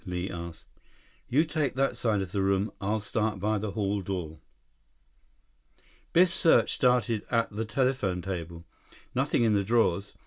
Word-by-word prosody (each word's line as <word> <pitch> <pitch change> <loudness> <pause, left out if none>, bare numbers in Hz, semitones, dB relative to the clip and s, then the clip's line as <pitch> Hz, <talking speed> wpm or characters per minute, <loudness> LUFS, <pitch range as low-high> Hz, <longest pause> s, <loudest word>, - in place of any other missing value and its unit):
Li 90 +1 -4
asked. 85 -1 -8 0.6
"You 145 +6 +4
take 150 -5 -1
that 135 -1 +1
side 110 -5 0
of 90 - -8
the 100 - -1
room. 100 +2 +1
I'll 105 +3 0
start 105 0 -2
by 105 +2 0
the 105 -1 -4
hall 100 -1 -1
door." 90 -5 -5 1.7
Biff's 175 0 +5
search 170 -3 +4
started 120 -4 +2
at 115 -1 +1
the 110 +2 -3
telephone 110 -6 0
table. 85 -3 -6 0.5
Nothing - - +1
in 110 -2 +3
the 100 -1 +2
drawers. 100 -3 +1
105 Hz, 150 wpm, -28 LUFS, 95-120 Hz, 1.7 s, Biff's